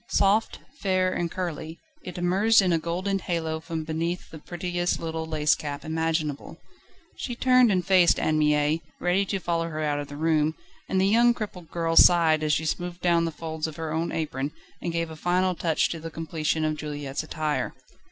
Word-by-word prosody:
Soft, 205 +3 +2 0.2
fair, 185 -1 +1
and 170 - -1
curly, 165 -2 -5 0.3
it 180 - -7
emerged 195 +6 +4
in 185 -3 +3
a 165 - +2
golden 185 +4 -2
halo 165 -4 -2
from 160 0 -5
beneath 165 +3 -3
the 160 - -9
prettiest 175 +2 -2
little 160 -1 -4
lace 155 -1 +2
cap 145 0 -5
imaginable. 160 -1 -2 0.6
She 240 - -4
turned 255 -2 +5
and 180 -3 +1
faced 185 -2 +5
Anne 155 0 +1
Mie, 150 +1 +2 0.2
ready 180 +3 +1
to 195 - -1
follow 170 -2 -1
her 155 -1 -4
out 145 -1 0
of 145 - -5
the 145 - -9
room, 155 0 +1 0.3
and 190 - +1
the 190 - +3
young 235 +4 +4
crippled 185 -7 -7
girl 165 -1 -1
sighed 165 -3 +6
as 155 -1 0
she 160 - 0
smoothed 175 +2 -3
down 170 -1 +3
the 165 - -2
folds 160 0 -4
of 155 - -8
her 160 -1 -4
own 165 +1 -1
apron, 145 -3 -3 0.3
and 170 - -2
gave 165 -1 -2
a - - -7
final 180 +3 +1
touch 165 -2 +1
to 165 - -4
the 165 +1 -6
completion 160 -1 -2
of 155 0 -1
Juliette's 145 -2 -4
attire. 155 -1 -2
165 Hz, 195 wpm, -26 LUFS, 155-180 Hz, 0.6 s, sighed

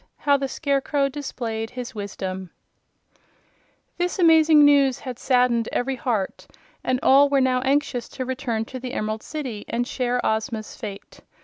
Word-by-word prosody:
How 285 -1 +3
the 275 -1 -1
Scarecrow 280 0 0
Displayed 235 -6 -4
His 250 +1 -7
Wisdom 190 -3 -5 1.5
This 355 +2 -1
amazing 320 -4 +6
news 280 -3 +4
had 250 -2 -7
saddened 245 -3 +2
every 265 +2 -1
heart 225 -6 -2 0.4
and 255 0 0
all 280 +2 +6
were 280 -1 +3
now 255 -1 +2
anxious 265 -2 0
to 260 - -2
return 245 -3 -2
to 255 +2 -7
the 250 0 -6
Emerald 215 0 -2
City 260 -9 -5
and 240 +1 -1
share 250 -1 -1
Ozma's 220 0 -2
fate. 200 -3 -9
255 Hz, 145 wpm, -23 LUFS, 225-280 Hz, 1.5 s, amazing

